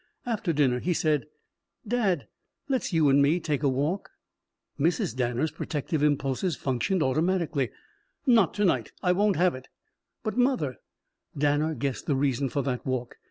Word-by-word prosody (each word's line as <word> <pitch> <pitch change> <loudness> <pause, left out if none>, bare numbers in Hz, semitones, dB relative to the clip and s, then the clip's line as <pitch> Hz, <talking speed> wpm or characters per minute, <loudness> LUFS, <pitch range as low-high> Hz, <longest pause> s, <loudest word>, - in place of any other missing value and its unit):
After 220 -7 -1
dinner 135 -5 +2
he 175 +6 0
said: 150 -3 +1 0.6
"Dad, 200 - 0 0.4
let's 265 -6 -1
you 160 -4 +3
and 140 +1 +5
me 150 +5 +3
take 150 -5 -1
a 140 - +3
walk." 145 +9 -1 0.7
Mrs. 150 -6 +1
Danner's 125 +4 0
protective 155 0 -3
impulses 145 +3 +1
functioned 145 +8 0
automatically. 155 -2 +1 0.6
"Not 230 - +4
to 205 - +2
night. 130 - +1
I 180 - +3
won't 205 +2 +2
have 180 +3 +3
it." 130 +1 -9 0.6
"But, 215 +1 -3
mother 245 - +1 0.3
" - - -22
Danner 150 +2 +1
guessed 140 -3 -3
the 145 - +2
reason 135 0 +1
for 140 +2 -1
that 125 -1 -2
walk. 130 -2 -3
150 Hz, 160 wpm, -27 LUFS, 135-180 Hz, 0.7 s, and